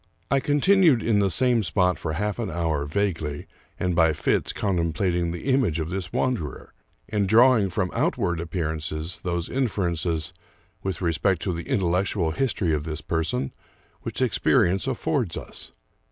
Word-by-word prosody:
I 140 - +4
continued 145 - +4
in 110 -3 +2
the 100 -1 +2
same 120 +5 +3
spot 90 -1 +1
for 80 - -3
half 105 +7 -2
an 115 -4 -2
hour, 80 -5 -1
vaguely, 80 -3 -2 0.3
and 90 -1 0
by 80 -2 +4
fits,, - - 0
contemplating 85 -2 0
the 85 +1 -5
image 130 - +1
of 80 +2 -3
this 95 -2 -4
wanderer, 110 - -2 0.3
and 105 -3 0
drawing 115 -2 +5
from 90 0 -1
outward 85 -1 0
appearances 80 -1 -3
those 85 -2 -2
inferences, 85 - -1 0.5
with 95 0 -3
respect 85 +2 +1
to 95 - -1
the 85 +9 -6
intellectual 95 - +1
history 95 -5 0
of 75 -1 -1
this 75 0 -5
person, 80 -5 -2 0.5
which - - -2
ex - - 0
perience 95 +7 +3
affords 130 - -1
us. - - -6
90 Hz, 155 wpm, -25 LUFS, 80-105 Hz, 0.5 s, drawing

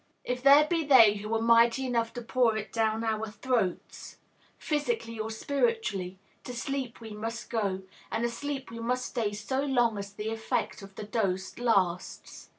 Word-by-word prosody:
If 250 0 -3
there 280 +3 +7
be 330 0 +1
they 230 -8 +7
who 210 +2 -6
are 225 - 0
mighty 235 +3 +4
enough 230 -2 0
to 240 - -6
pour 235 -2 +2
it 210 -2 -6
down 225 0 +1
our 220 -1 -1
throats, 225 -4 -2 0.4
physically 295 - -2
or 220 0 -2
spiritually, 225 - -1 0.3
to 250 - -7
sleep 260 0 -4
we 225 -1 -9
must 225 +3 -6
go, 200 -5 -1 0.3
and 225 +1 0
asleep 270 +3 -4
we 230 - -7
must 250 +2 -1
stay 225 -4 -2
so 210 +6 -2
long 240 -6 +1
as 200 0 -6
the 210 +2 -5
effect 225 +1 -2
of 195 0 -12
the - - -6
dose 195 -3 -2
lasts. 195 -7 -1
230 Hz, 170 wpm, -29 LUFS, 210-255 Hz, 0.4 s, there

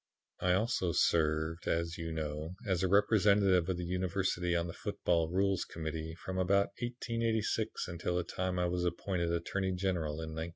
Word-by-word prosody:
"I 90 0 +2
also 95 -3 +1
served, 80 +1 +1
as 85 0 -1
you 80 0 -4
know, 80 +2 -4
as 95 -4 +1
a 95 - +2
representative 100 -2 +4
of 90 - 0
the 90 - -3
University 90 0 0
on 85 0 +1
the 85 - -5
Football 85 -2 0
Rules 95 +1 +1
Committee 80 0 -5
from 95 +2 -4
about 100 +2 +3
1886 115 -2 -1
until 90 0 -2
the 90 - +1
time 90 +1 -2
I 90 - +2
was 90 0 0
appointed 85 0 -1
Attorney 95 +3 -1
General 90 -5 -1
in 80 +1 -5
1911. 80 +1 -4
90 Hz, 170 wpm, -33 LUFS, 85-95 Hz, -, representative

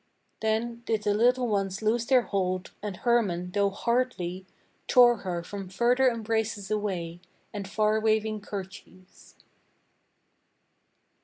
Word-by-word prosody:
Then 225 +2 -1
did 220 -2 0
the 205 - +2
little 245 +3 +3
ones 200 -1 -1
loose 225 +2 +1
their 255 -2 +4
hold, 185 -3 -2
and 205 -3 -5
Hermann, 195 -8 +1
though 200 +1 +2
hardly, 195 -5 -2 0.4
Tore 245 -2 +6
her 175 -4 -4
from 195 +1 -7
further 245 +6 +3
embraces 220 -3 -2
away, 180 -5 -3 0.3
and 200 -2 -5
far 215 +1 +2
waving 220 -1 0
kerchiefs. 190 -2 -10
210 Hz, 115 wpm, -27 LUFS, 190-230 Hz, 0.4 s, Tore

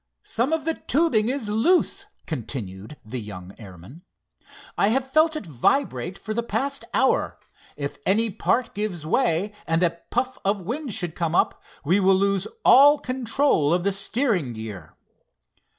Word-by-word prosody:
"Some 245 +6 -1
of 320 -1 -1
the 325 - +1
tubing 255 -9 +1
is 260 -4 -1
loose," 350 - +2 0.2
continued 115 - -6
the 120 +3 -5
young 95 -3 -9
airman. 100 - -12 0.7
"I - - +2
have 265 +4 0
felt 315 +1 +4
it 310 - -5
vibrate 165 - 0
for 215 - -5
the 235 - 0
past 275 +4 -2
hour. - - +1 0.4
If 140 -1 -5
any 220 +5 +2
part 230 +4 0
gives 200 -7 -4
way, 205 0 +1
and 165 +1 +1
a 170 -1 0
puff 260 0 -1
of 200 +1 +1
wind 250 - -4
should 180 -6 -2
come 165 0 -2
up, - - +1 0.2
we 180 +7 +3
will 190 0 +4
lose 195 0 +1 0.2
all 290 +3 +8
control 255 - +1
of 175 +1 +1
the 200 - +2
steering 195 - 0
gear." 105 -7 -8
200 Hz, 155 wpm, -24 LUFS, 155-255 Hz, 0.7 s, all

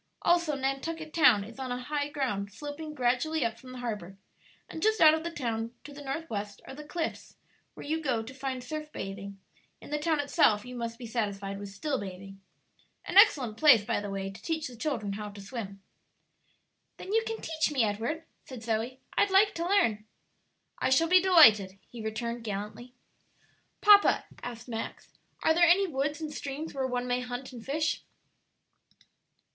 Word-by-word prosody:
Also 340 -3 +3
Nantucket 305 +4 -3
Town 210 -11 +5
is 230 +5 -11
on 260 -1 -4
high 290 +3 -2
ground 245 -9 -2
sloping 295 +6 -7
gradually 255 +3 +1
up 230 0 -3
from 255 +1 -12
the 255 - -8
harbor; 210 -6 -5 0.5
and 320 - -8
just 435 +2 +2
out 310 -1 +8
of 320 0 -1
the 340 - -2
town, 230 -6 -3
to 290 - -10
the 290 - -10
north 305 +4 -4
west, 205 -3 -5
are - - -8
the 300 +2 -9
Cliffs, 325 +2 -5 0.4
where - - -9
you 320 +2 -1
go 250 -7 0
to 240 +4 -9
find 265 -1 -4
surf 305 +3 -6
bathing; 195 -2 -7 0.4
in - - -13
the 300 - 0
town 315 0 +1
itself 280 -7 +3
you 250 0 -8
must 230 -1 -4
be 245 - -8
satisfied 200 -4 -3
with 200 -1 -7
still 265 +8 -2
bathing. 195 0 -9 0.6
An - - -5
excellent 275 - +6
place, 255 -9 +6
by 230 -2 0
the 205 - -5
way, 195 0 -4
to 195 - -13
teach 320 -2 -2
the 250 - -10
children 230 -6 -2
how 210 +1 -5
to 205 0 -11
swim." 195 -2 -7 1.1
"Then 390 - -6
you 450 - +4
can 450 0 -4
teach 315 -1 -1
me, 265 -5 +2
Edward," 225 +10 -2 0.2
said 250 -4 -9
Zoe; 230 +3 -2
"I'd 405 - +3
like 390 +2 +5
to 335 +1 -2
learn." 230 - +2 0.8
"I - - +1
shall 320 +5 +3
be 365 0 +7
delighted," 220 - +6
he 235 - -8
returned, 235 +2 -3
gallantly. 215 +4 -6 0.9
"Papa," 410 -1 +6 0.2
asked 240 -1 -7
Max, 225 -2 -6 0.3
"are 320 - +5
there 340 +1 +5
any 390 +3 +5
woods 290 -2 -2
and 310 -2 -5
streams 290 +3 -5
where 265 -2 -1
one 250 -1 -2
may 245 0 +1
hunt 250 +1 -6
and 235 -2 -9
fish?" 305 +5 -1
255 Hz, 185 wpm, -29 LUFS, 220-310 Hz, 1.1 s, out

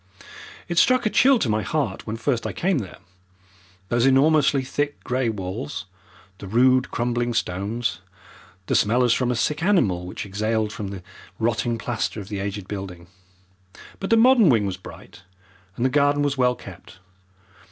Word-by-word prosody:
It 170 0 +1
struck 255 -2 +3
a 215 - +1
chill 270 0 +5
to 145 - -1
my 110 0 +1
heart 135 -11 -3
when 110 - -3
first 120 0 -1
I - - -5
came 185 -4 0
there, 100 -6 -8 0.9
those 120 0 +1
enormously 140 0 +4
thick 145 +2 -3
grey 125 -1 0
walls, 105 +3 -5 0.5
the 100 - -8
rude 125 +5 +3
crumbling 120 0 -1
stones, 105 +6 -2 0.6
the - - -2
smell 120 +4 +3
as 120 -2 +4
from 125 0 0
a 125 - 0
sick 150 +6 -1
animal 110 - +1
which 90 - -6
exhaled 110 +2 -1
from 105 - -5
the 95 -2 -8 0.3
rotting 115 +1 0
plaster 115 -1 -3
of 100 0 -9
the 100 -2 -4
aged 100 -1 -5
building. 90 -4 -7 0.9
But 195 - -4
the 230 - +4
modern 235 -5 +6
wing 110 -6 +3
was 95 -2 -2
bright 95 +1 -13 0.5
and 120 - -1
the - - +3
garden 145 +1 +2
was 145 -1 0
well 125 -2 +2
kept. - - -13
120 Hz, 170 wpm, -23 LUFS, 105-145 Hz, 0.9 s, modern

